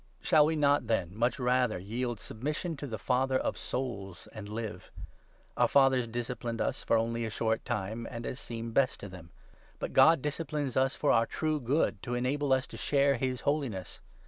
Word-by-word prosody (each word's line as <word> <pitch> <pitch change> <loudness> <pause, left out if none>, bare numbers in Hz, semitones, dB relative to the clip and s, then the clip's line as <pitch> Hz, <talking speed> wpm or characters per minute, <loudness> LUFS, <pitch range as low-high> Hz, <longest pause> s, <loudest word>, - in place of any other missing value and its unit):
Shall 150 -1 +5
we 160 - 0
not, 145 -4 +3
then, 95 -5 0
much 120 +3 +1
rather 125 -3 +2
yield 115 +5 -3
submission 150 +11 -4
to 145 - -5
the 110 -4 -4
Father 130 +4 +1
of - - -1
souls, 100 -8 -5
and 105 -2 -8
live? 110 0 -5 0.7
Our - - +4
fathers 135 -3 +4
disciplined 120 0 -4
us - - -1
for 115 - +3
only 115 +1 -1
a 115 - -2
short 110 +1 -1
10 120 - 0
time 110 +4 -5
and 115 0 -6
as 130 - -4
seemed 115 -3 -6
best 135 +1 +2
to 100 - -7
them; 90 -3 -11 0.5
but - - -5
God 160 -4 +6
disciplines 150 -2 -2
us 135 +1 +2
for 145 - +2
our 115 -1 +4
true 155 -1 -1
good, 125 -5 0
to 120 - -3
enable 135 +3 0
us 130 -1 +3
to - - -6
share 140 -2 +2
his 130 0 -2
holiness. 140 -11 -2
125 Hz, 195 wpm, -30 LUFS, 115-140 Hz, 0.7 s, God